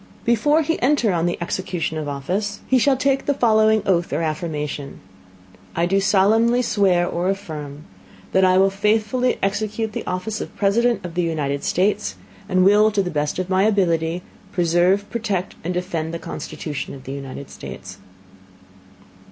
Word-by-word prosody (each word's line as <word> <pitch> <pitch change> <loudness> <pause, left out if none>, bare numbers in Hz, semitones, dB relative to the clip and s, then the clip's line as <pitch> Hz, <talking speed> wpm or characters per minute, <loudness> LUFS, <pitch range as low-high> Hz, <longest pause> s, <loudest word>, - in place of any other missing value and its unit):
Before 290 +7 +3
he 325 +2 -1
enter 250 -6 +2
on 170 0 +1
the 175 - -1
Execution 175 -2 -3
of 155 - -4
his - - -2
Office, 190 +9 -3
he 260 - +3
shall 270 +2 +3
take 270 +1 0
the 285 - +2
following 220 -3 +3
Oath 175 -3 +1
or 155 +4 -1
Affirmation: 150 -3 -4 0.8
"I 170 - +2
do 195 +3 +2
solemnly 220 +5 +3
swear 190 -6 +2
(or 175 +1 -1
affirm) 155 -7 -5 0.5
that 190 - +3
I 185 0 +5
will 195 +1 +4
faithfully 215 +5 +1
execute 215 +2 -1
the - - -4
Office 195 +4 -3
of - - -8
President 230 +2 +2
of 175 - -6
the 175 - 0
United 150 -4 -2
States, 180 - 0 0.3
and 185 0 +3
will 210 +2 +6
to 205 -2 0
the 180 - -4
best 150 -1 -1
of 185 -1 -2
my 190 0 +2
Ability, 175 -5 +1 0.3
preserve, 180 +2 +2
protect 205 -6 -2
and 175 - -2
defend 170 -3 -3
the - - -2
Constitution 150 -4 -6
of 135 - -12
the 135 - -6
United 140 0 -7
States." - - -9
190 Hz, 170 wpm, -21 LUFS, 165-215 Hz, 0.8 s, will